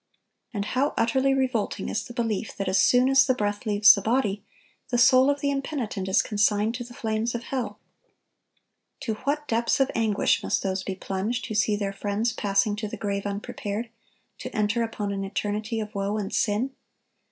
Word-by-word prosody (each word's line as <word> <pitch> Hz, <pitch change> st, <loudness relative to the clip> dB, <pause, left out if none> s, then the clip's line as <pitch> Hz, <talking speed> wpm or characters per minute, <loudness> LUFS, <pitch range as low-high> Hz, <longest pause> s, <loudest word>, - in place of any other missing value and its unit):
And 205 Hz, -4 st, -3 dB
how 265 Hz, +6 st, 0 dB
utterly 260 Hz, +4 st, +2 dB
revolting 260 Hz, -5 st, 0 dB
is 215 Hz, -, -2 dB
the 240 Hz, -, -9 dB
belief 225 Hz, -2 st, -2 dB
that 195 Hz, -, -2 dB
as 190 Hz, +1 st, +2 dB
soon 250 Hz, +1 st, +4 dB
as 270 Hz, 0 st, +5 dB
the 255 Hz, -, +3 dB
breath 205 Hz, -2 st, -2 dB
leaves 210 Hz, 0 st, +7 dB
the 200 Hz, -, -2 dB
body, 220 Hz, -2 st, 0 dB, 0.5 s
the 245 Hz, -, +1 dB
soul 255 Hz, +2 st, +6 dB
of 285 Hz, 0 st, 0 dB
the 280 Hz, -, +1 dB
impenitent 265 Hz, -9 st, -3 dB
is 190 Hz, -, +3 dB
consigned 210 Hz, +1 st, +1 dB
to 245 Hz, 0 st, -4 dB
the 240 Hz, 0 st, -12 dB
flames 225 Hz, -1 st, -1 dB
of 235 Hz, -, -4 dB
hell! 260 Hz, -1 st, -3 dB, 1.2 s
To 225 Hz, -, -2 dB
what 295 Hz, +1 st, -1 dB
depths 235 Hz, +3 st, +1 dB
of 270 Hz, 0 st, +2 dB
anguish 220 Hz, -3 st, +2 dB
must -, -, -1 dB
those 190 Hz, -1 st, -1 dB
be 190 Hz, 0 st, -4 dB
plunged 195 Hz, +5 st, -3 dB
who -, -, -5 dB
see 210 Hz, 0 st, +2 dB
their 200 Hz, -1 st, -2 dB
friends 205 Hz, +3 st, -1 dB
passing 205 Hz, +1 st, +1 dB
to 215 Hz, 0 st, -3 dB
the -, -, -7 dB
grave 200 Hz, -1 st, -2 dB
unprepared, 205 Hz, +2 st, -4 dB, 0.5 s
to 255 Hz, -, -5 dB
enter 210 Hz, +2 st, +1 dB
upon 215 Hz, -3 st, -2 dB
an 195 Hz, 0 st, -3 dB
eternity 210 Hz, +3 st, -2 dB
of 210 Hz, 0 st, -5 dB
woe 200 Hz, +1 st, -1 dB
and 200 Hz, -2 st, -4 dB
sin! 215 Hz, +6 st, +1 dB
220 Hz, 190 wpm, -26 LUFS, 205-245 Hz, 1.2 s, leaves